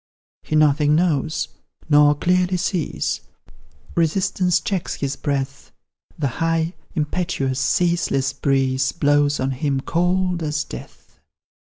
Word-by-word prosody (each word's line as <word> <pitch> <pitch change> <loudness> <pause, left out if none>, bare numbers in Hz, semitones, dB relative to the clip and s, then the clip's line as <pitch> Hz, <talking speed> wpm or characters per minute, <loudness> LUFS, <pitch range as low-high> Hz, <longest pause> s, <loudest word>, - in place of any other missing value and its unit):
He 155 - -3
nothing 150 0 +4
knows 160 -2 +1 0.4
nor 145 -1 +5
clearly 180 +3 +1
sees, 165 - -2 0.7
Resistance 180 +2 +1
checks 190 -2 -2
his 140 -1 -3
breath, 140 -1 -3 0.5
The 145 - 0
high, 165 +1 +1 0.2
impetuous, 150 -4 -1
ceaseless 135 -4 +1
breeze 135 -1 +1
Blows 145 -2 +2
on 130 +1 0
him 135 +1 -1
cold 180 +2 0
as 150 -1 -1
death. - - -12
150 Hz, 110 wpm, -21 LUFS, 140-175 Hz, 0.7 s, nor